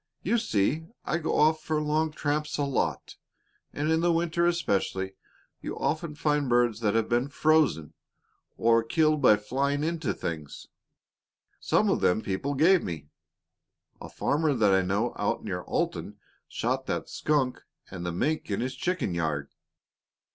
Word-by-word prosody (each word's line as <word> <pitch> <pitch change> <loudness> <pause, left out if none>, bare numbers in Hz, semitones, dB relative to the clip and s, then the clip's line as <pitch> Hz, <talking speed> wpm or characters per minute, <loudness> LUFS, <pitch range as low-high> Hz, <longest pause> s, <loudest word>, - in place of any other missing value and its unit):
You 235 - +2
see, 155 - 0 0.2
I 170 - 0
go 160 - -1
off 155 +1 +4
for 155 -1 0
long 155 +1 0
tramps 150 0 -2
a 145 - 0
lot, 140 -2 -2 0.5
and 150 +2 -1
in 160 - +3
the 175 +1 +2
winter 170 +1 +1
especially 95 - -1 0.5
you - - -5
often 155 0 -2
find 150 -3 0
birds 120 -2 +2
that 110 -2 0
have 115 -1 +2
been 120 +3 +1
frozen, 150 - +2 0.6
or 115 0 +4
killed 155 +5 +2
by 105 -6 +6
flying 140 +7 -1
into 160 -5 -1
things. 75 -3 -6 0.9
Some - - +2
of - - 0
them 100 +5 +2
people 135 +9 -2
gave 170 +6 +5
me. 75 -4 -6 0.9
A - - -8
farmer 150 0 0
that 105 -5 +3
I 95 - +4
know 100 +6 0
out - - -1
near - - -3
Alton - - -3 0.3
shot 130 +3 -2
that - - -2
skunk 140 -4 0 0.3
and 90 -2 -6
the 85 - -2
mink 150 - -1
in 100 - -1
his 125 +2 -2
chicken 165 - -1
yard. 80 -4 -2
140 Hz, 155 wpm, -27 LUFS, 105-155 Hz, 0.9 s, by